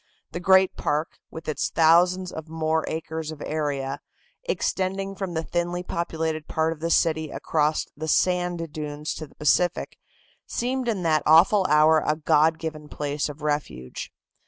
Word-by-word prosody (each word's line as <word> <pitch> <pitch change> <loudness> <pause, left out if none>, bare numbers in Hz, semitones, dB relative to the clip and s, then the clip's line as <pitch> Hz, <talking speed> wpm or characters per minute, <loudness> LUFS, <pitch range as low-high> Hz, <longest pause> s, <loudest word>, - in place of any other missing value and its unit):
The 170 - -4
great 190 0 +4
park, 150 +2 -2
with 160 - -9
its 155 - -1
thousand 180 +3 +4
and 160 0 -7
more 160 0 0
acres 160 0 -4
of 155 -2 -7
area, 145 -3 -2 0.5
extending 195 - -1
from 190 -3 -5
the 160 - -1
thinly 175 +1 -2
populated 160 -3 -3
part 160 +1 0
of 160 - -16
the 165 +1 -2
city 160 -2 +2
across 155 0 0
the 155 +2 -5
sand 175 -1 +1
dunes 150 0 -4
to 155 - -7
the - - -23
Pacific, 175 +4 +1 0.5
seemed 255 +1 -2
in 205 -6 -1
that 155 -2 +3
awful 180 +5 +6
hour 155 +1 +5
a 150 - +1
God 155 +1 +3
given 155 -2 -6
place 145 0 -2
of 150 +1 -10
refuge. 145 - -3
160 Hz, 155 wpm, -25 LUFS, 150-175 Hz, 0.5 s, awful